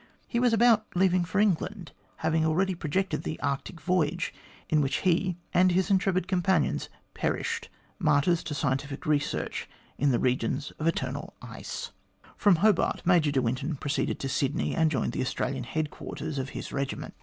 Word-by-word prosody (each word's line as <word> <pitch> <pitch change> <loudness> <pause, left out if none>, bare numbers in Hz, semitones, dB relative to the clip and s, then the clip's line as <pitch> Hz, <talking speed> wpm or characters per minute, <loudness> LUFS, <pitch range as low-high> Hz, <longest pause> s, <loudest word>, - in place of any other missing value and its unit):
He 235 - 0
was 245 -1 +4
about 225 -1 +4
leaving 180 -1 +3
for 185 +4 -1
England, 195 -2 0 0.3
having 160 0 +2
already 185 +5 +2
projected 180 +3 -1
the 155 - -4
Arctic 140 +5 -3
voyage 175 +2 0 0.3
in 155 -1 +3
which 135 -1 0
he 180 0 +2 0.2
and 185 +1 +5
his 190 +3 +1
intrepid 185 -1 +2
companions 180 -3 +1 0.2
perished, - - -2 0.3
martyrs 165 +4 +3
to 155 -2 -3
scientific 140 0 -2
research, 150 -2 -1 0.3
in 145 - +3
the 125 - +3
regions 130 +2 0
of 155 - 0
eternal 165 - -2 1.0
From 205 -3 +5
Hobart 205 +2 +2
Major 170 -4 +4
de 135 -2 +1
Winton 130 +6 -1
proceeded 145 +1 -1
to 135 - -2
Sydney, 135 +1 0
and 160 -1 +3
joined 130 -6 0
the - - -2
Australian 130 0 -2
headquarters 155 0 -4
of 135 0 -3
his - - -6
regiment. 140 -1 -3
160 Hz, 155 wpm, -28 LUFS, 140-185 Hz, 1.0 s, and